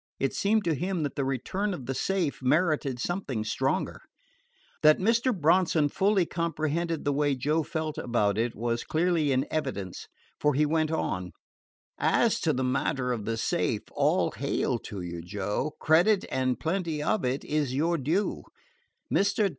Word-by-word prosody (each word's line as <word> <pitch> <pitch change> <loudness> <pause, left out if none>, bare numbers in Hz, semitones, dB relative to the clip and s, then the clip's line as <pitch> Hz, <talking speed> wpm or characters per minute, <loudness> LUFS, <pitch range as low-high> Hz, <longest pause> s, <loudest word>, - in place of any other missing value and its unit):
It 135 - 0
seemed 215 +1 +2
to 165 - +1
him 180 +2 -2
that 145 - -2
the 140 - -1
return 185 - -2
of 130 - -9
the 135 - -2
safe 170 +1 -1
merited 150 -1 +1
something 140 - -2
stronger. 110 - -1 0.8
That 155 0 +6
Mr. 230 +6 +2
Bronson 165 -4 +3
fully 195 +2 +2
comprehended 165 0 -2
the 145 - +2
way 145 0 +1
Joe 150 +5 +1
felt 155 0 -3
about 105 -4 +1
it 115 +1 -1
was 115 +1 -1
clearly 160 -3 +1
in 130 0 +2
evidence, 130 - -3 0.3
for 150 -2 +2
he 150 +2 +3
went 155 +1 +1
on: 90 - -2 0.7
"As - - +3
to - - +1
the 130 - -1
matter 125 0 0
of 110 -4 -4
the 115 0 -2
safe, - - 0
all - - +2
hail - - -1
to 100 -3 -7
you, 85 -1 -5
Joe! 105 - -3
Credit, 180 +6 +4
and 130 -1 0
plenty 165 -3 -1
of 190 +5 +1
it, 125 +2 -1
is 145 -4 -1
your 165 +4 +1
due. 165 +10 0 0.7
Mr. 200 +1 +2
150 Hz, 160 wpm, -28 LUFS, 130-170 Hz, 0.8 s, That